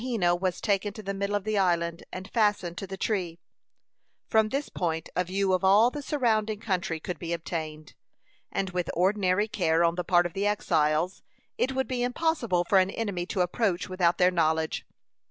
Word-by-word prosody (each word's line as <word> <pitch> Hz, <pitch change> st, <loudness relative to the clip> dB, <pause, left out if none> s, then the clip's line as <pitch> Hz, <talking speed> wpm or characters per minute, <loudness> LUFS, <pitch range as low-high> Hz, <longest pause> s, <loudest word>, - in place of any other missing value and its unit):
Wahena 220 Hz, -9 st, +1 dB
was 180 Hz, 0 st, -2 dB
taken 205 Hz, -1 st, 0 dB
to 215 Hz, -, -9 dB
the 200 Hz, 0 st, -3 dB
middle 200 Hz, +1 st, -2 dB
of 205 Hz, -, -1 dB
the 215 Hz, -1 st, 0 dB
island, 170 Hz, -2 st, 0 dB
and 185 Hz, +1 st, -7 dB
fastened 205 Hz, -6 st, +1 dB
to 195 Hz, -, -6 dB
the 195 Hz, +1 st, -6 dB
tree. 185 Hz, -5 st, -2 dB, 0.9 s
From 220 Hz, -1 st, +2 dB
this 275 Hz, +5 st, -2 dB
point 165 Hz, -2 st, -3 dB
a 180 Hz, -, +2 dB
view 190 Hz, +1 st, 0 dB
of 185 Hz, -, +1 dB
all 205 Hz, +6 st, +5 dB
the 295 Hz, -, -5 dB
surrounding 220 Hz, -7 st, 0 dB
country 180 Hz, -6 st, -2 dB
could 175 Hz, +1 st, -5 dB
be 170 Hz, -1 st, -3 dB
obtained, 155 Hz, -2 st, -5 dB, 0.6 s
and 190 Hz, -1 st, -2 dB
with 180 Hz, -1 st, -2 dB
ordinary 190 Hz, +2 st, +2 dB
care 170 Hz, -6 st, +1 dB
on 170 Hz, 0 st, +3 dB
the 180 Hz, +1 st, -3 dB
part 175 Hz, 0 st, +3 dB
of 175 Hz, -, -4 dB
the 200 Hz, +1 st, 0 dB
exiles, 165 Hz, -3 st, +1 dB, 0.3 s
it 265 Hz, -, 0 dB
would 265 Hz, 0 st, 0 dB
be 250 Hz, -1 st, -2 dB
impossible 245 Hz, -, +1 dB
for 195 Hz, -, +5 dB
an 185 Hz, 0 st, +2 dB
enemy 195 Hz, -5 st, -3 dB
to 195 Hz, -, -1 dB
approach 180 Hz, 0 st, 0 dB
without 180 Hz, -2 st, +2 dB
their 180 Hz, 0 st, +4 dB
knowledge. 160 Hz, -2 st, 0 dB
185 Hz, 190 wpm, -27 LUFS, 175-210 Hz, 0.9 s, all